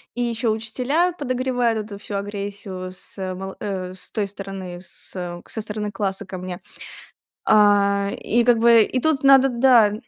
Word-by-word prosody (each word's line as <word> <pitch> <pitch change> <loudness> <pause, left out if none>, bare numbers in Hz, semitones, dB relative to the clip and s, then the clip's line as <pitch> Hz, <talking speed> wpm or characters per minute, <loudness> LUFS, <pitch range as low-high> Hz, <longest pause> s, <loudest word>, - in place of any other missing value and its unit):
и 245 - -2
ещё 230 -1 -1
учителя 255 +11 0
подогревают 255 -6 0
эту 200 -2 -9
всю 205 - -6
агрессию 200 -2 -5
с 185 - -8 0.2
мол 190 +1 -6
э, 185 -3 -4
с 185 - -7
той 205 -2 -1
стороны, 195 -3 -7
с, 180 - -9
э, 175 -1 -5
со 220 - -5
стороны 210 -1 -4
класса 195 0 -3
ко 185 -1 -7
мне. 180 -1 -6 0.9
А, 200 -1 +4
и 235 +1 +1
как 240 -2 +4
бы 230 -1 +6
и 255 +4 -1
тут 305 -2 +1
надо, 270 0 +7
да 235 -4 +5
210 Hz, 165 wpm, -22 LUFS, 195-240 Hz, 0.9 s, надо